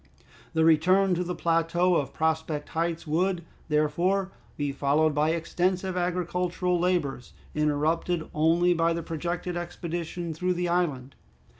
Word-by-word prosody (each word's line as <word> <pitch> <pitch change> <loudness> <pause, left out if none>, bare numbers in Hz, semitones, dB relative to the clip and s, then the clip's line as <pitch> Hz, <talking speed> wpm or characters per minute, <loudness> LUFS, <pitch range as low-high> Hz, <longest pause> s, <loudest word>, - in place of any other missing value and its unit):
The 160 0 +4
return 185 +4 +4
to 180 +1 0
the 180 0 -4
plateau 170 +2 +2
of 145 -4 0
Prospect 160 -1 -1
Heights 165 +1 -2
would, 170 +2 0 0.2
therefore, 170 +6 +1 0.3
be 145 -1 -1
followed 145 +3 +2
by 150 +2 +2
extensive 180 +3 -1
agricultural 180 0 0
labors, 170 -8 -1 0.2
interrupted 155 +3 0
only 170 +3 +3
by 165 0 +2
the 165 0 -3
projected 175 +2 -3
expedition 175 -1 -4
through 180 +3 -1
the 175 0 -1
island. 145 -7 -1
170 Hz, 130 wpm, -27 LUFS, 155-180 Hz, 0.3 s, The